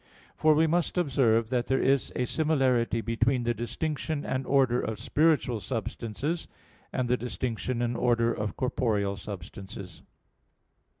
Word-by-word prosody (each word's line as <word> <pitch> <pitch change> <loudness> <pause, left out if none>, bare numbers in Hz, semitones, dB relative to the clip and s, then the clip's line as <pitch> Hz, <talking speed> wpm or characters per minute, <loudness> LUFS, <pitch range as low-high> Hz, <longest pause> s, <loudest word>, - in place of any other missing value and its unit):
For 155 -1 +4
we 160 +2 +4
must 170 +3 0
observe 125 -8 +2
that 125 -2 0
there 135 - +2
is 135 0 +2
a 125 - 0
similarity 130 -6 +1
between 120 +2 +1
the 120 0 +1
distinction 145 +6 -3
and 130 0 -2
order 130 -3 +3
of 110 -1 -4
spiritual 150 -7 +2
substances 115 - -3 0.4
and 130 -1 -1
the 125 +1 +2
distinction 120 0 -2
and 120 0 -1
order 120 -1 +2
of 105 -1 -4
corporeal 105 -6 0
substances. 95 -2 -8
120 Hz, 135 wpm, -28 LUFS, 115-135 Hz, 0.4 s, For